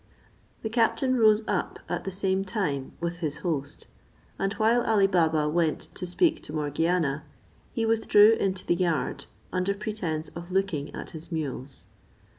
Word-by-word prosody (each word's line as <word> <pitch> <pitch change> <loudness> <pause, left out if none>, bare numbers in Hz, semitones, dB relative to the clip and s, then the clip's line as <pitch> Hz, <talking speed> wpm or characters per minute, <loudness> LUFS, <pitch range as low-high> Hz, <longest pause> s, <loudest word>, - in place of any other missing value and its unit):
The 220 - -1
captain 255 +3 +2
rose 215 -2 +5
up - - -1
at - - -3
the - - -1
same 190 0 0
time 185 - -2
with 170 0 -3
his 155 -4 -3
host; 145 -5 -3 0.5
and 195 - 0
while 225 +2 +3
Ali 215 -4 +3
Baba 160 -5 +2
went 160 0 +1
to 180 - -5
speak 320 - +2
to - - -9
Morgiana 150 0 0 0.5
he 230 - -1
withdrew 225 -1 +6
into 190 -4 -1
the - - +3
yard, 170 -5 -1 0.3
under 185 +2 +1
pretence 190 -7 -3
of 170 +1 -9
looking 185 -7 -1
at - - -7
his 160 +2 -10
mules. 140 -4 -5
180 Hz, 155 wpm, -27 LUFS, 155-210 Hz, 0.5 s, withdrew